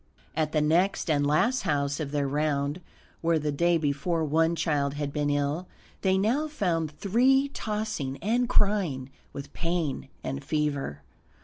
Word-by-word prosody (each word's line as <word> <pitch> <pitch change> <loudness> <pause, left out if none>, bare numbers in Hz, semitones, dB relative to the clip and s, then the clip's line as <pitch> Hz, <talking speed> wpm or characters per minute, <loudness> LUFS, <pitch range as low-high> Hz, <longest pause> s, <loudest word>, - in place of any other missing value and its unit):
At 155 -1 0
the 155 - +2
next 170 +3 +2
and 145 -1 +2
last 235 - +2
house 145 -4 0
of 150 -3 -3
their 145 -1 0
round, 145 +2 0 0.4
where 165 0 +2
the 150 -1 -1
day 170 +4 +3
before 160 +2 0
one 160 +2 +2
child 145 -3 0
had 145 -1 -3
been 145 -1 0
ill, 145 +5 0 0.3
they 190 -1 +3
now 245 +11 +1
found 165 - -1
three 260 - +3
tossing 210 -11 -3
and 230 - 0
crying 175 - +1 0.2
with 140 0 -8
pain 165 -5 -2
and 70 0 -4
fever. 145 - -2
155 Hz, 150 wpm, -27 LUFS, 145-190 Hz, 0.4 s, day